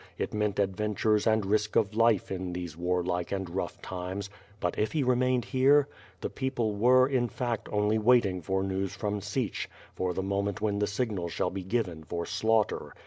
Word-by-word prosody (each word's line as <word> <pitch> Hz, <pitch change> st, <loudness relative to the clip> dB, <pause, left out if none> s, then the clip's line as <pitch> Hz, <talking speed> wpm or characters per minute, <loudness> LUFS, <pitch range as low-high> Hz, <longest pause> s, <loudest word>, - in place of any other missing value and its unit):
It -, -, -3 dB
meant 105 Hz, -1 st, 0 dB
adventures 105 Hz, +2 st, +1 dB
and 110 Hz, -2 st, +3 dB
risk 105 Hz, +2 st, +1 dB
of 105 Hz, -2 st, +3 dB
life 115 Hz, -3 st, +3 dB
in 90 Hz, -1 st, -3 dB
these 85 Hz, -3 st, -5 dB
warlike 90 Hz, 0 st, -1 dB
and 95 Hz, -1 st, -2 dB
rough 90 Hz, +3 st, -4 dB
times; 95 Hz, +2 st, -5 dB, 0.3 s
but 90 Hz, -, -2 dB
if 105 Hz, -, 0 dB
he 155 Hz, -3 st, +1 dB
remained 125 Hz, -1 st, +2 dB
here? 140 Hz, +2 st, +4 dB, 0.3 s
The -, -, -2 dB
peoplq 120 Hz, -6 st, -1 dB
were, 130 Hz, +4 st, +5 dB
in 125 Hz, -3 st, +1 dB
fact, 120 Hz, -2 st, -3 dB
only 105 Hz, +1 st, +2 dB
wait 120 Hz, +1 st, +5 dB
ing 90 Hz, -2 st, -2 dB
for 95 Hz, +3 st, -1 dB
news 95 Hz, -1 st, -2 dB
from 105 Hz, -1 st, -2 dB
Sich, 105 Hz, +3 st, -2 dB, 0.2 s
for 90 Hz, -1 st, -2 dB
the 95 Hz, -, -1 dB
moment 100 Hz, 0 st, -1 dB
when 105 Hz, -1 st, 0 dB
the 105 Hz, -, +1 dB
signal 100 Hz, -5 st, -2 dB
shall -, -, -1 dB
be 95 Hz, -, -4 dB
given 95 Hz, -6 st, -2 dB
for 85 Hz, +2 st, -4 dB
slaughter. 110 Hz, -1 st, 0 dB
105 Hz, 190 wpm, -29 LUFS, 95-115 Hz, 0.3 s, were